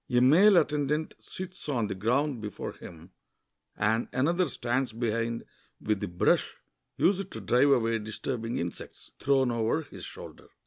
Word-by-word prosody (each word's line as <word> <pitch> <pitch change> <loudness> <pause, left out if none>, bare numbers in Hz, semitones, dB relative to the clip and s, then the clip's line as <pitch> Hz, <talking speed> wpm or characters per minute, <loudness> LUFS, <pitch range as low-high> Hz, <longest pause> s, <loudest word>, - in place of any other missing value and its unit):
A 120 - +3
male 175 +11 +6
attendant 150 0 +1
sits 185 -4 -8
on 120 -6 +1
the 100 - -3
groimd 125 +6 0
before 105 -1 -5
him, 85 +2 -12 0.7
and 110 +3 +1
another 170 +7 +2
stands 125 -2 -2
behind 115 0 -1 0.4
with 105 -1 -1
the 105 - -3
brush, 85 0 +1 0.4
used 195 +1 +2
to - - -7
drive 125 +4 +3
away 115 -4 +3
disturbing 115 +2 -4
insects, 85 0 -6
thrown 135 -2 +2
over 115 +7 0
his - - -12
shoulder. - - -10
120 Hz, 145 wpm, -28 LUFS, 110-145 Hz, 0.7 s, male